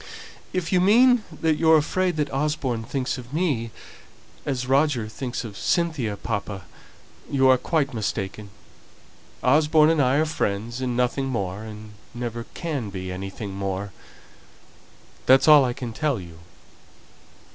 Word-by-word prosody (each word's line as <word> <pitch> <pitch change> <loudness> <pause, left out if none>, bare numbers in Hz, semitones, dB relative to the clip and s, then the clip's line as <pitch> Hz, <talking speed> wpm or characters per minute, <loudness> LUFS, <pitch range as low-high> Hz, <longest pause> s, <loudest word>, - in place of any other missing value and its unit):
"If 185 -3 -2
you 180 - +4
mean 240 +4 +5
that 160 -2 0
you're 160 0 +5
afraid 180 +4 0
that 150 -3 -2
Osborne 135 -4 -1
thinks 130 +2 -3
of 125 0 -11
me 140 -10 0 0.8
as 130 -3 -1
Roger 135 -3 +2
thinks 125 +3 -5
of 110 -4 -8
Cynthia, 150 - 0
papa, 100 -3 -4 0.7
you 135 -1 +3
are 130 0 +6
quite 140 -3 0
mistaken. 100 -1 -4 0.9
Osborne 150 +3 +4
and 160 -3 +2
I 130 0 +3
are 155 +2 +3
friends 120 -5 -2
and 125 -2 -2
nothing 125 +2 0
more, 100 -6 -3
and 110 -1 -9 0.2
never 120 -1 -4
can 145 - -3
be 95 -1 -6
anything 95 +2 -6
more. 100 0 -4 1.3
That's 130 +3 +6
all 150 -2 +8
I 125 -1 0
can 120 -2 -6
tell 150 -3 0
you." 85 -3 -11
130 Hz, 140 wpm, -24 LUFS, 110-150 Hz, 1.3 s, all